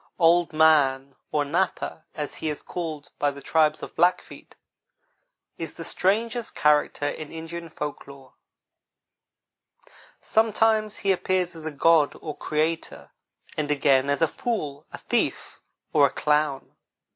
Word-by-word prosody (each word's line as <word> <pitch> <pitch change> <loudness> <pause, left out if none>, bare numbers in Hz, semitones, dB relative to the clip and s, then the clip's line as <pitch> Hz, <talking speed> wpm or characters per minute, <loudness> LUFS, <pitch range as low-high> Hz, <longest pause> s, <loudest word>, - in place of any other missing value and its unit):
Old 170 0 +4
man, 140 -4 +3 0.2
or 150 -1 +1
Napa, 165 0 -2
as 150 -1 -4
he 160 - -4
is 150 - -5
called 160 -4 -6
by 145 - +2
the 140 0 -8
tribes 155 +1 +1
of - - -8
Blackfeet, 175 +2 0 1.0
is - - -6
the - - -7
strangest 225 +5 -1
character 150 -1 +2
in 150 +1 -5
Indian 165 +1 -7
folk 150 -2 -6
lore. 135 -2 -14 1.9
Sometimes 220 -1 +2
he 200 - +1
appears 185 -1 0
as 160 -1 -7
a - - -3
god 155 +1 +3
or 155 -2 -6
creator, 160 +2 -2 0.4
and 150 -1 -2
again 140 -2 +3
as 145 +3 +1
a - - +5
fool, 150 -8 -4
a - - -7
thief, - - -2 0.3
or 145 -2 +6
a - - -8
clown. 150 -1 0
155 Hz, 135 wpm, -25 LUFS, 145-175 Hz, 1.9 s, or